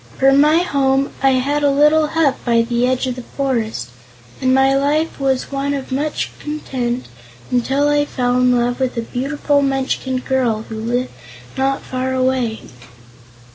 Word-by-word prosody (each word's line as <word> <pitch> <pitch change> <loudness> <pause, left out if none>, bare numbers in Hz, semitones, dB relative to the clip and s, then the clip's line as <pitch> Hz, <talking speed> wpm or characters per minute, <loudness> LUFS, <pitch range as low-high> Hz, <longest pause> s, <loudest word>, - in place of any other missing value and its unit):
For 270 0 +4
my 300 +5 +4
home 275 -4 +1
I 270 0 +4
had 280 +3 0
a 290 - +3
little 300 +2 +4
hut 300 -3 +1
by 235 -1 +3
the 240 +1 0
edge 255 +1 0
of 255 -1 -2
the 250 - -7
forest, 230 - -3 0.5
and 260 -1 +2
my 270 +1 +4
life 295 +4 0
was 265 -1 -1
one 280 +1 -1
of 270 -1 -6
much 290 +3 -2
content 255 -5 -3 0.5
until 270 +4 +1
I 290 0 +2
fell 245 -3 -1
in 250 0 +3
love 245 +1 0
with 260 -2 -1
a 230 - -1
beautiful 285 +4 0
Munchkin 265 -1 -1
girl 250 -4 0
who 220 -1 -7
lived 245 +3 -2 0.4
not 270 +1 0
far 260 0 -3
away." 255 -3 0
265 Hz, 165 wpm, -18 LUFS, 250-280 Hz, 0.5 s, For